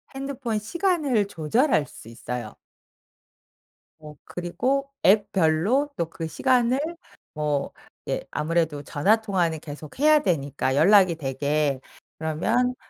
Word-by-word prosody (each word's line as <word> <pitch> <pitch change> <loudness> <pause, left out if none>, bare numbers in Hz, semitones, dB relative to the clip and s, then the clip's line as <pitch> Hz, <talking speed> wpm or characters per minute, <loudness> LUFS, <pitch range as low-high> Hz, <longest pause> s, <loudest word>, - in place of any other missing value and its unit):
핸드폰 270 -4 -3
시간을 295 - 0
조절할 165 - +1
수 125 - -14
있어요. 115 0 -6 1.4
뭐 150 -1 -11
그리고 250 +11 -2 0.2
앱 205 +1 +4
별로 190 - +2
또 165 -1 -2
그 165 -3 -5
시간을 250 - +2 0.5
뭐 150 -2 -1 0.4
예 - - -1
아무래도 155 -2 -1
전화 205 +12 +2
통화는 175 -7 -1
계속해야 165 - +1
되니까 140 -7 0
연락이 185 +2 +5
되게 140 0 -1 0.4
그러면 225 +11 0
175 Hz, 235 characters per minute, -24 LUFS, 150-240 Hz, 1.4 s, 연락이